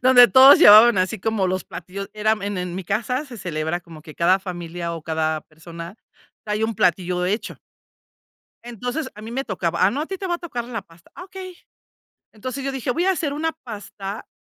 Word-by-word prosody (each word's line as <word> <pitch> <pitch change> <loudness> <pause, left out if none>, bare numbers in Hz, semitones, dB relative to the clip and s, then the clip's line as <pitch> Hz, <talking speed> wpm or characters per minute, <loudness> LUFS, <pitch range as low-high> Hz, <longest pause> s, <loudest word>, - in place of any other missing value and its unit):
donde 250 -1 +8
todos 265 +1 +8
llevaban 215 0 +8
así 185 0 0
como 220 -2 0
los 185 +1 -2
platillos 195 +2 -8
era 215 0 +1
en 205 -2 -3
en 180 -1 -4
mi 190 -1 -5
casa, 240 - -1
se 250 -5 -11
celebra 170 -1 -3
como 165 -3 -14
que 155 -1 -12
cada 180 +3 +3
familia, 175 -2 -6
o, 165 - -8
cada 160 0 -1
persona 165 +5 -11 0.5
trae 210 +1 -1
un 225 0 -2
platillo 180 0 +1
hecho. 205 +5 -3 1.1
Entonces, 245 +6 -4
a 215 - -11
mí 225 - -8
me 265 +3 -3
tocaba 175 -4 -1
ah, 195 - +4
no, 275 - -3
a 315 - -5
ti 385 - -5
te 385 - -4
va 350 - 0
a - - -4
tocar 260 -10 -5
la 230 -3 -5
pasta. 165 -3 -22
Ah, 360 - -9
okey. 375 -2 -9 0.8
Entonces, 255 +5 -6
yo 275 - -2
dije: 260 -1 -3
"Voy 340 +8 0
a 385 - +3
hacer 315 -6 -1
una 320 +3 -2
pasta, 205 -2 -7
210 Hz, 210 wpm, -22 LUFS, 175-255 Hz, 1.1 s, donde